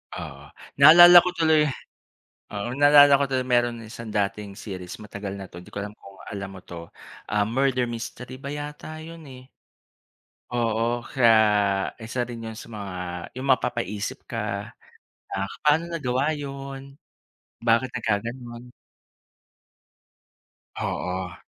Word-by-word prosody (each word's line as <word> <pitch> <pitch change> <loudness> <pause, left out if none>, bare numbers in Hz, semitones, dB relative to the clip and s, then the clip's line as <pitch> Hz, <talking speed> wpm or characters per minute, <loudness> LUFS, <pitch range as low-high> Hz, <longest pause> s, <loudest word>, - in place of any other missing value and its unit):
Oo, - - -8 0.4
naalala 175 +5 +10
ko - - +1
tuloy 160 -2 +4 0.9
oo. 100 +3 -3
Naalala 145 -1 +7
ko 140 - +2
tuloy 130 -1 0
meron 120 -2 +1
isang 115 +1 -9
dating 100 -1 -2
series, 95 -4 -7
matagal 100 -1 -6
na 95 -1 -9
’to, 85 - -9
di 90 - -15
ko 100 - -5
alam 105 - -6
kung 100 0 -15 0.2
alam 100 -1 -5
mo - - -9
’to. 85 -1 -9 0.4
Ah, 105 0 +1
murder 130 +3 +1
mystery 120 +2 -7
ba 135 - -8
yata 150 +2 -6
’yun, 165 -2 -11
eh. 130 -1 -11 1.1
Oo, 120 0 0
kaya 115 -4 +5 0.7
isa 120 +2 -3
din 115 -2 -7
’yon 110 - -10
sa - - -10
mga 100 -4 -6 0.4
’yung 135 - -4
mapapaisip 120 -5 -1
ka, 105 -2 -4 0.6
"Ah, 95 0 -2 0.2
paano 155 +3 +3
nagawa 145 -2 -1
’yon? 135 -1 -8 0.7
Bakit 115 +2 +3
nagkagano'n?" 120 +2 -4 2.0
Oo. 90 -1 -4
120 Hz, 130 wpm, -25 LUFS, 105-140 Hz, 2.0 s, naalala